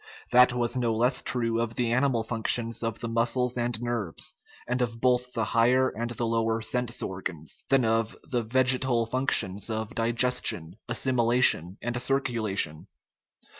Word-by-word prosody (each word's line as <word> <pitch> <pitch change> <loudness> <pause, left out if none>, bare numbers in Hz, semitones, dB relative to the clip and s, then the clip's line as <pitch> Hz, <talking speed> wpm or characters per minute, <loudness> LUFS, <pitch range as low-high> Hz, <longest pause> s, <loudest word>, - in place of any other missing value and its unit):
That 125 +1 +6
was 120 0 -1
no 120 -3 0
less 120 +4 +3
true 115 -2 -1
of 115 -1 -3
the 120 -2 0
animal 125 -2 +1
functions 115 +1 +1
of 115 -1 -3
the 115 - -3
muscles 120 +2 0
and 120 -2 -2
nerves, 120 -8 -2 0.3
and 125 +1 -1
of 115 -1 -2
both 125 0 +1
the 115 - -1
higher 125 +3 +3
and 120 +1 -5
the 120 0 -3
lower 115 0 0
sense 120 +1 -1
organs, 90 -4 -5
than 135 -3 +3
of 115 0 0
the 120 -2 -2
vegetal 125 0 +1
functions 115 -5 +1
of 110 -1 -4
digestion, 115 -7 +1
assimilation, 120 -7 +2
and 120 0 -2
circulation. 110 - -1
120 Hz, 150 wpm, -27 LUFS, 115-125 Hz, 0.3 s, That